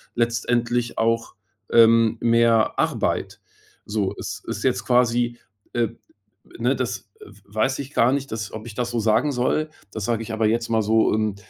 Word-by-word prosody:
letztendlich 120 0 0
auch, 115 0 0 0.4
ähm, 115 0 +5
mehr 115 -1 +3
Arbeit. - - -1 0.4
So 105 -2 -1
es - - -6
ist - - -5
jetzt - - 0
quasi, 120 -1 +2 0.4
äh 120 -2 +1 0.7
ne, - - +2
das, - - -4
äh, - - -11
w 100 - -19
weiß 130 +5 +1
ich 140 0 -7
gar 120 +2 +4
nicht, 140 -2 -3
das 110 -1 -4
ob 110 0 -7
ich 115 -3 -9
das 120 0 -2
so 120 - -1
sagen 115 +7 +2
soll. 140 +5 0 0.2
Das 110 -3 -4
sage 115 -1 -1
ich 115 - -7
aber 110 0 0
jetzt 115 +2 0
mal 110 -1 +2
so, 110 +1 +3
ähm, 110 -2 0
115 Hz, 180 wpm, -23 LUFS, 110-120 Hz, 0.7 s, ähm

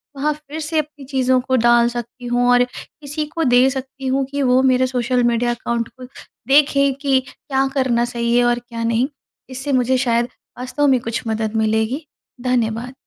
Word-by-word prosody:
वहाँ 295 +2 0
फिर 300 +1 -9
से 315 +1 -1
अपनी 300 -2 -6
चीज़ों 260 -1 +2
को 260 +1 0
डाल 240 -1 +4
सकती 240 +1 -7
हूँ 245 0 +1
और 245 0 +5
किसी 295 +4 -7
को 330 - 0
दे 250 -1 +5
सकती 265 0 -6
हूँ 265 +1 +1
कि 285 0 -2
वो 255 0 +4
मेरे 255 -1 +3
सोशल 250 0 0
मीडिया 240 0 +1
अकाउंट 235 -1 -2
को 255 - -9 0.4
देखें 280 0 +4
कि 275 -2 +3
क्या 270 0 -2
करना 250 -3 +1
सही 235 -1 -1
है 245 - +4
और 240 0 +2
क्या 235 -1 -7
नहीं, 230 +2 +1 0.4
इससे 265 +2 -4
मुझे 255 0 +2
शायद 240 -2 +1 0.3
वास्तव 260 +3 0
में 260 -2 +4
कुछ 230 0 -3
मदद 220 0 -2
मिलेगी। 220 +7 0 0.4
धन्यवाद। 245 -1 -1
255 Hz, 185 wpm, -19 LUFS, 240-270 Hz, 0.4 s, और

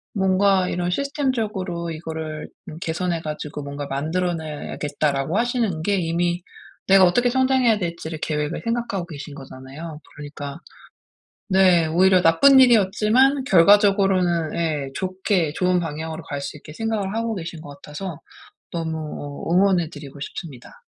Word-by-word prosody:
"뭔가 190 -1 +3
이런 180 0 -1
시스템적으로 215 - -2
이거를 160 -1 -6 0.2
음 155 - -9
개선해 170 0 -2
가지고 150 -1 -6
뭔가 140 0 -6
만들어내야겠다."라고 155 0 -2
하시는 235 -8 0
게 200 +5 +1
이미 175 0 -1 0.4
내가 190 -1 +7
어떻게 245 +8 +2
성장해야 260 -4 +3
될지를 170 -3 -4
계획을 150 0 -2
생각하고 230 -6 -2
계신 145 -2 -8
거잖아요. 140 +4 -9
그러니까 145 0 -8 0.9
네. 185 -3 +5
오히려 185 +3 +4
나쁜 265 +13 +6
일이었지만 240 +4 +4
결과적으로는 195 - +4
예. 150 -5 -1
좋게 185 -4 -1
좋은 180 0 +1
방향으로 160 0 -5
갈 145 -1 -5
수 145 - -6
있게 150 +1 -12
생각을 215 0 -2
하고 225 0 -2
계신 165 -3 -6
것 145 - -11
같아서 155 +2 -7 0.5
너무 160 -1 -3
어 150 +1 -5
응원해 185 -3 +3
드리고 145 -2 -10
싶습니다. 140 -3 -9
170 Hz, 345 characters per minute, -22 LUFS, 155-195 Hz, 0.9 s, 내가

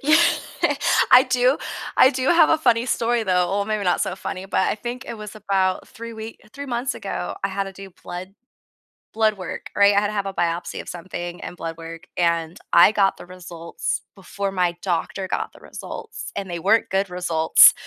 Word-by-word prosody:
Yeah, 305 +3 +5 0.9
I 255 - +9
do 250 +2 +2 0.4
I 260 - +7
do 260 -1 -2
have 335 -2 +6
a 320 - +4
funny 240 -4 +2
story, 235 -1 +1
though 180 -3 +2
well, 200 +1 0
maybe 215 -2 -2
not 180 - +2
so 185 - -1
funny, 190 0 -5
but 190 - 0
I - - +1
think 240 +4 -6
it 230 - -6
was 210 0 -8
about 190 -3 0
3 230 -1 -9
wee 220 0 -8
3 285 0 -7
months 245 +2 -2
ago, 90 - -4
I - - +2
had 195 +1 -2
to 195 - -8
do 195 0 -11
blood 185 +2 -7 0.8
blood 220 -2 +2
work, 185 - -6
right? 200 0 +6
I 200 - +5
had 205 - +1
to 215 - -5
have 200 -2 -1
a 195 - -4
biopsy 170 0 -2
of - - -10
something 175 0 -6
and - - -7
blood 165 0 -5
work, 165 +1 -9
and 170 -1 0 0.2
I 170 +4 +8
got 195 -2 +2
the - - -11
results 175 -2 -5
before 195 +1 -4
my 180 -2 0
doctor 185 +1 -2
got - - -3
the - - -16
results, - - -8
and 195 -2 -4
they 170 -1 -4
weren't 215 +6 +3
good 195 0 0
results. 170 -3 +6
195 Hz, 205 wpm, -22 LUFS, 180-225 Hz, 0.9 s, I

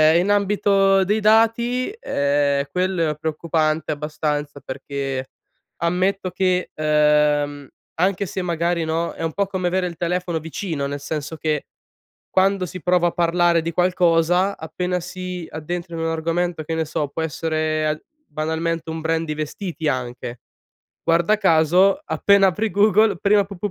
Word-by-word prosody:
ehm - - +6
in 185 +3 0
ambito 195 -1 +3
dei 210 +3 +1
dati, 230 +3 +3
ehm, 140 - +1
quello 180 -2 0
è - - -5
preoccupante 155 0 -1
abbastanza, 150 -1 -3
perché, 135 -1 -5 0.5
ammetto 185 +3 0
che, 185 0 0
ehm, 150 -2 +2 0.3
anche 195 +2 +1
se 190 - -4
magari 170 -1 0
no, 160 +1 -1
è - - -7
un 165 -1 -2
po' 200 - +1
come 185 -2 -2
avere 180 +1 0
il 170 - -7
telefono 175 0 -1
vicino, 160 -2 -4
nel 145 0 -4
senso 150 +2 -5
che 155 -2 -1 0.6
quando 190 0 +2
si 180 0 -8
prova 180 0 +3
a - - 0
parlare 170 0 +2
di 165 +1 -3
qualcosa, 180 +1 +2
appena 180 +3 -3
si 180 -1 -6
addentra 170 +2 -5
in 165 - -4
un 165 - 0
argomento, 165 +1 -1
che 165 +1 -3
ne 160 0 0
so, 150 -1 -2
può 155 +3 -4
essere 155 0 -1
al 155 0 -2 0.3
banalmente 160 +2 -2
un 160 0 -5
brand 165 +1 0
di 155 - -3
vestiti 155 +1 -4
anche, 125 -2 -3 0.6
guarda 170 +5 +3
caso 185 - +4
appena 200 -6 +4
apri 210 +5 -1
Google 210 0 +4
prima 205 +3 +3
p 200 0 -10
p 185 - -3
170 Hz, 155 wpm, -21 LUFS, 155-185 Hz, 0.6 s, ehm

